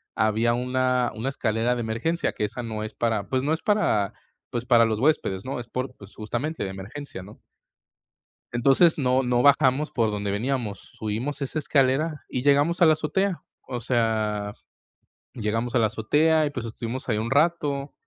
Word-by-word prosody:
había 110 +2 +2
una 125 0 +1
una 115 +5 -3
escalera 120 -2 0
de 120 - -3
emergencia, 115 +10 -1
que 105 - -1
esa 120 +4 -5
no 110 -2 -4
es 110 0 -6
para 110 -4 -1
pues 130 -1 0
no 150 +3 +1
es 160 - -2
para, 155 - +1 0.4
pues, 120 0 -4
para 120 -2 +5
los 110 -1 -1
huéspedes, 120 -9 +1
¿no?, 130 -1 -3
es 120 - -8
por 130 +1 -4
pues, 100 0 -14
justamente 120 +9 -3
de 95 - -3
emergencia, 95 +5 -8
¿no? 105 +3 -14 1.1
Entonces, 135 +8 +4
no 130 -1 +2
no 125 -1 +1
bajamos 140 +1 +4
por 115 -3 +1
donde 100 -1 -3
veníamos, 110 -1 -2 0.2
subimos 115 +7 -3
esa 140 +3 -2
escalera 145 +1 +1
y 125 - -3
llegamos 145 +5 +3
a 175 - +7
la 155 - +7
azotea. 170 +5 -1 0.2
O 120 -2 -4
sea, 110 -4 0 0.8
llegamos 115 +2 -2
a - - +4
la 115 - +4
azotea 150 +9 +2
y, - - -1
pues, 125 -5 -5
estuvimos 115 +3 -5
ahí 110 -3 +1
un 110 +2 -2
rato, 145 -2 +1
125 Hz, 180 wpm, -25 LUFS, 110-140 Hz, 1.1 s, a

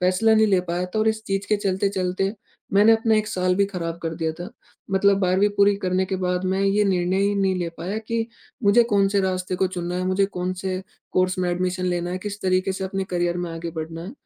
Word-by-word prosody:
फैसला 185 +5 +3
नहीं 220 0 +5
ले 190 -3 +3
पाया 175 +1 -1
था 180 +4 -4
और 215 +1 +3
इस 220 0 -1
चीज 195 0 -2
के 210 - +2
चलते-चलते 195 0 -1 0.4
मैंने 205 +3 +6
अपना 225 0 +3
एक 215 0 +1
साल 185 -3 +1
भी 200 - +4
खराब 170 -4 -4
कर 165 -1 -3
दिया 160 -1 -2
था। 180 - -6 0.4
मतलब 195 +1 +3
12वीं 190 +2 +3
पूरी 200 0 +5
करने 185 0 +1
के 190 - -2
बाद 180 0 -1
मैं 190 +1 0
यह 195 +1 +2
निर्णय 185 -1 +1
ही 205 +1 +2
नहीं 195 -1 +1
ले 175 -1 -2
पाया 190 +6 -3
कि 225 +1 -2 0.4
मुझे 205 +4 +6
कौन 200 -1 +4
से 200 0 +1
रास्ते 185 -1 -1
को 190 - +2
चुनना 180 -1 -4
है, 185 - -1
मुझे 190 +1 +2
कौन 180 -2 -3
से 185 0 -3 0.3
कोर्स 185 0 +1
में 180 -1 0
एडमिशन 185 +1 -1
लेना 175 -1 -1
है, 185 - -3
किस 205 +1 -6
तरीके 185 +1 +1
से 190 0 -4
अपने 195 0 -2
करियर 175 -1 0
में 175 -1 -3
आगे 165 +1 -5
बढ़ना 165 0 -6
है 195 +7 -7
185 Hz, 240 wpm, -23 LUFS, 180-200 Hz, 0.4 s, मैंने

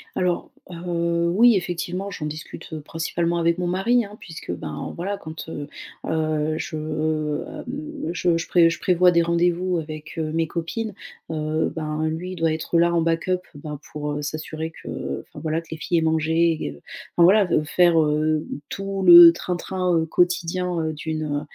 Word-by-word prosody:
Alors, 180 -1 0 0.2
heu, 170 -1 -1
oui 235 0 +6
effectivement 180 +2 -3
j'en 165 -6 -5
discute 155 +1 -7
principalement 165 +2 -2
avec 170 0 +2
mon 180 - -2
mari, 225 +7 +2
hein, 205 0 -11
puisque 160 - -7
ben 80 -3 -5
voilà, 195 +4 -3
quand, 160 -3 -9
heu 145 -2 -6 0.4
heu, 155 -1 0
je, 155 - -5
heu, 155 0 -2
hem, 290 - -6
je 175 -1 +1
je 165 - -3
prév 170 -2 +5
je - - -4
prévois 180 0 +4
des 170 -1 +3
rendez-vous 175 +1 +1
avec, 155 0 -7
heu, 155 -1 -1
mes 165 0 +1
copines, 195 +8 -4 0.4
heu, 155 0 -1
ben, 155 0 -2
lui 175 +4 -4
il - - -7
doit 165 -2 +1
être 160 +2 -1
là 170 +1 +4
en 170 - +3
backup 165 +3 +1 0.2
ben, 150 0 -7
pour, 150 0 -4
heu, 150 - -3
s'assurer 155 +2 -4
que, - - -12
heu 70 0 -4
enfin - - -11
voilà 160 +1 -1
que 165 - -21
les 160 - -5
filles 170 +2 -1
aient 165 - +1
mangé 160 +1 +2
et 75 0 -5 0.4
enfin 175 - +5
voilà 195 +1 +5 0.2
faire, 170 +1 +4
heu, 155 +1 +1 0.2
tout 195 0 -4
le 175 -1 +11
train-train, 180 +1 -1
heu, 160 - +1
quotidien, 175 +1 0
heu, 160 -1 -1
d'une 155 +1 -4
heu, 145 -1 -1
165 Hz, 185 wpm, -23 LUFS, 155-180 Hz, 0.4 s, le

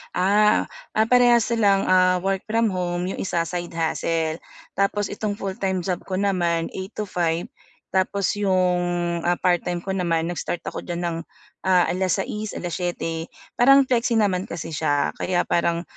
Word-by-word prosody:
Ah, 205 +3 +3 0.4
parehas 245 -2 +5
silang 200 -4 +3 0.4
work-from-home 190 -3 -1
'yong - - -6
isa 170 -3 0
side 175 0 -5
hustle, 165 0 -1 0.4
tapos 200 +1 0
itong 205 0 -3
full-time 190 -2 -2
job 180 -1 -1
ko 185 - -2
naman 175 -4 0
8:00 190 +3 -7
to 215 - -2
5:00 170 -2 -1 0.4
tapos 190 +2 0
'yong, 185 -3 +2 0.4
ah, 175 0 +1
part-time 175 -1 +1
ko 190 +2 -4
naman 165 -3 0
nag-start 175 0 -3
ako - - -5
diyan 175 0 -4
ng 170 -1 -1 0.5
6:00, 190 +3 +1
7:00 170 -2 -3 0.3
parang 275 +3 +7
flexi 235 -1 +1
naman 190 -3 +1
kasi 165 -1 -6
siya 145 -2 +1
kaya 180 -1 0
parang, 170 0 +1
185 Hz, 135 wpm, -23 LUFS, 175-200 Hz, 0.5 s, parang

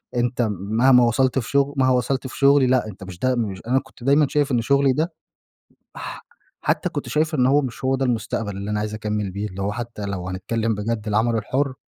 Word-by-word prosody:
أنت 120 +1 0
مهما 115 +7 +3
وصلت 130 +3 +2
في 120 - -6
شغل 140 0 +2
مهما 130 -1 +4
وصلت 130 +2 0
في - - -9
شغلي 140 -1 +5
لأ، 125 -3 +2
أنت 100 -2 -9
مش 95 -2 -9
ده 130 +3 +1
مش 105 -6 -3
أنا 130 +2 +3
كنت - - -16
دايمًا 140 +3 +4
شايف 145 -1 +1
إن 120 -2 +2
شُغلي 140 +1 +3
ده 160 +5 -1 0.8
ح - - -8 0.3
حتى - - 0
كنت - - -5
شايف 155 +1 0
إن 125 -4 +3
هو 145 +2 +4
مش 125 0 -6
هو 135 +1 +2
ده 135 - -1
المستقبل 110 -3 -2
اللي 100 +1 -5
أنا 105 0 0
عايز 105 0 -3
أكمّل 105 -2 -2
بيه. 100 +3 -4
اللي 95 0 -6
هو 100 - -1
حتىّ 120 -1 -6
لو 90 -2 -4
هنتكلّم 110 +5 -1
بجد 110 +1 -3
العمل 110 +2 +2
الحُر 130 +5 -1
120 Hz, 220 wpm, -22 LUFS, 105-135 Hz, 0.8 s, شغلي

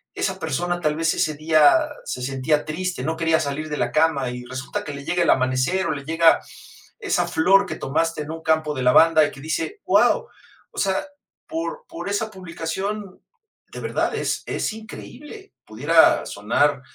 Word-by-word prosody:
esa 190 -1 -2
persona 175 +3 -2
tal 150 -1 0
vez 165 +1 +1
ese 155 -1 0
día 155 - +4 0.2
se 125 - -5
sentía 135 +3 0
triste, 175 -2 -3
no 160 +4 -1
quería 165 -1 +2
salir 155 +2 -3
de 150 - -3
la - - -1
cama 155 -5 +2
y 125 0 -7
resulta 130 +1 -5
que 145 - -6
le 140 0 -9
llega 175 +3 0
el - - +1
amanecer 130 +8 +2
o - - 0
le 140 - -4
llega 165 +1 +4 0.6
esa - - 0
flor 195 +5 +4
que - - -4
tomaste 155 +2 -1
en 150 - -7
un 165 - -7
campo 155 -1 +1
de 130 - -4
lavanda 160 +5 +6
y - - -4
que 140 - -13
dice: 160 - -3
"Guau", - - +3 0.4
o - - -18
sea, 190 -1 0 0.4
por 330 +10 -5
por 335 -11 -6
esa 215 +2 -2
publicación 190 +2 -5 0.5
de - - -8
verdad - - -1
es - - -2
es - - -2
increíble, 290 - -11
pudiera 145 +10 +3
sonar, 130 +7 0
160 Hz, 180 wpm, -22 LUFS, 145-190 Hz, 0.6 s, lavanda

